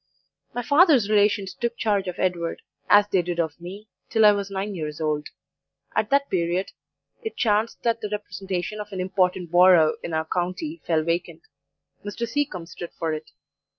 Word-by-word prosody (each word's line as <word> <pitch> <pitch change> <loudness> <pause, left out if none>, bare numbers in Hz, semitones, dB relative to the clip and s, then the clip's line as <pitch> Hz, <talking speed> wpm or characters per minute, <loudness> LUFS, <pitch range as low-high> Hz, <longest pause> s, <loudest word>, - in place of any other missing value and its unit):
"My 245 - -2
father's 285 - +5
relations 205 -2 +2
took 235 0 -3
charge 200 -3 0
of 180 - -4
Edward, 170 -2 -1 0.3
as 205 0 +6
they 190 -3 +2
did 175 0 -4
of 160 -1 -2
me, 195 +5 -9 0.2
till 220 -2 +4
I 210 - +9
was 200 -1 -2
nine 200 +1 -3
years 155 -4 -5
old. 150 -1 -1 0.7
At 215 -1 +1
that 280 +1 +3
period 175 +1 0 0.5
it 445 - -6
chanced 220 0 +1
that 230 -1 +1
the 210 - -3
representation 195 -1 -4
of 210 0 -7
an 190 - -5
important 185 -2 0
borough 175 -3 +6
in 165 - -4
our 160 0 0
county 185 - -3
fell 160 -2 +2
vacant; 170 0 -2 0.6
Mr. 210 +3 -4
Seacombe 230 -9 -2
stood 175 0 -9
for 160 -1 -1
it. 155 0 -6
190 Hz, 175 wpm, -24 LUFS, 170-215 Hz, 0.7 s, I